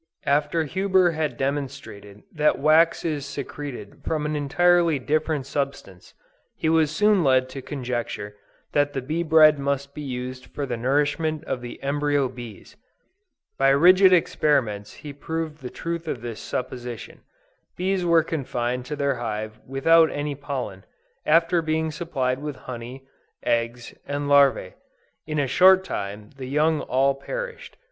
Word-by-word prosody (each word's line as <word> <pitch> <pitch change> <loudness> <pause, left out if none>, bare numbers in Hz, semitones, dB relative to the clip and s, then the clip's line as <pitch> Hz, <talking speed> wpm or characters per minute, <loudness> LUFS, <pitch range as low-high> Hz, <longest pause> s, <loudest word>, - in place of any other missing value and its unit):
After 150 +3 +1
Huber 190 +2 +2
had 155 -2 -2
demonstrated 135 -7 -5
that 150 -1 +2
wax 160 +4 +3
is 150 -4 -1
secreted 140 -5 -7
from 155 -2 -2
an 150 0 -1
entirely 170 +3 +3
different 150 +1 -1
substance, 135 -10 -5 0.4
he 160 - -1
was 160 -2 +3
soon 205 +4 +3
led 130 -2 +3
to 135 - -7
conjecture 120 -6 -4 0.4
that 145 0 +1
the 135 - -2
bee 155 +6 -2
bread 155 -2 +6
must 140 0 -2
be 150 - -7
used 130 -1 -6
for 145 - -4
the 125 -3 -3
nourishment 145 +5 0
of 130 - -4
the 120 0 -8
embryo 145 0 +1
bees. 120 -5 -11 0.8
By 135 0 +5
rigid 185 +7 +6
experiments 130 - +1
he 145 -1 -10
proved 155 +1 -5
the 125 - -6
truth 170 +3 -5
of 125 -6 -3
this 115 -2 -6
supposition. 125 -2 -6 0.6
Bees 185 0 0
were 170 -2 +4
confined 125 -5 -3
to 150 - -3
their 140 -2 0
hive 110 -2 -4
without 160 +5 +4
any 145 0 -3
pollen, 135 -9 -5 0.4
after 165 +2 +4
being 160 0 -1
supplied 135 -6 -2
with 150 -1 -5
honey, 125 +2 -8 0.4
eggs 115 +1 -1
and 145 0 -3
larvæ. 140 -9 +4 0.5
In 155 -1 -3
a 145 - +2
short 190 +7 +6
time 105 - -6
the 130 -1 -6
young 155 +3 +1
all 135 +2 +2
perished. - - -7
145 Hz, 145 wpm, -24 LUFS, 130-160 Hz, 0.8 s, bread